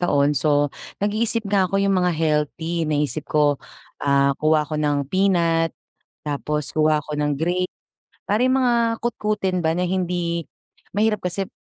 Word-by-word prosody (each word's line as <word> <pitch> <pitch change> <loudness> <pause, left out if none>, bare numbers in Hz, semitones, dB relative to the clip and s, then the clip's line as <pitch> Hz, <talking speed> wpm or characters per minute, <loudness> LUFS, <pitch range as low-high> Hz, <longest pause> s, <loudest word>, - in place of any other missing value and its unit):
Taon 145 -4 +2
so 145 0 +2 0.3
nag-iisip 220 +2 0
nga 195 -2 +2
ako 195 - -1
'yong 195 - +2
mga 180 -1 +2
healthy. 160 +1 -1
Naisip 150 0 -1
ko, 145 -2 +2 0.4
ah, 140 0 +3
kuha 155 0 +3
ako 150 0 -3
ng 145 -1 +1
peanut 170 -4 +2 0.5
tapos 150 0 -2
kuha 155 -1 +3
ako 150 - -7
ng 150 0 +1
grape. 175 +4 0 0.6
Para 210 +4 +2
'yong 260 +1 +3
mga 245 -2 +3 0.3
kutkutin 210 -6 -1
ba 160 - +2
na 180 +2 0
hindi 175 -2 -1 0.5
mahirap 210 +1 +1
kasi 180 +2 -2
170 Hz, 150 wpm, -22 LUFS, 150-190 Hz, 0.6 s, ah